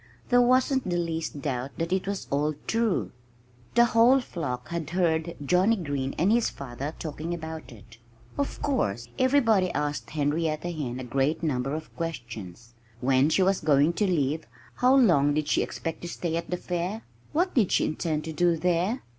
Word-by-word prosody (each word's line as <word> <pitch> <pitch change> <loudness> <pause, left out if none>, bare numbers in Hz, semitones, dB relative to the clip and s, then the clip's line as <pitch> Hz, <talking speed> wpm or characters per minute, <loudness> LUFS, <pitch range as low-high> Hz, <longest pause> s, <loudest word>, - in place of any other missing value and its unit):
There 245 0 +5
wasn't 255 -1 +3
the 175 - 0
least 165 -4 -3
doubt 135 -1 -3
that 165 +2 -1
it 190 0 -1
was 200 -1 -3
all 145 +2 +1
true. 225 -3 0 0.6
The 235 0 +7
whole 235 +3 +5
flock 145 - -5
had 170 -3 -3
heard 170 -1 0
Johnnie 185 +8 +4
Green 145 -7 -3
and 180 +6 +3
his 235 0 +3
father 140 +3 -6
talking 160 +2 -4
about 160 -2 -7
it. 115 0 -15 0.4
Of 280 - -3
course 120 - -1
everybody 230 -8 +3
asked 145 -6 -2
Henrietta 155 +3 -1
Hen 130 -7 -4
a - - -5
great 135 +6 0
number 135 -2 -1
of 155 0 -8
questions. 120 - -6 0.3
When 130 +1 +3
was 190 0 +3
she - - -13
going 145 +3 +4
to 205 +3 +1
leave? 155 -3 0 0.3
How 255 +2 +5
long 155 - +4
did 155 -1 0
she - - +2
expect 165 - -4
to 175 - -5
stay 170 -1 -3
at 170 0 -3
the 180 - -1
fair? 180 +5 -3 0.3
What 360 +4 +1
did 220 -8 +2
she - - +3
intend 155 -1 -2
to 160 - -5
do 170 +1 +2
there? 180 +8 0
165 Hz, 180 wpm, -27 LUFS, 145-190 Hz, 0.6 s, The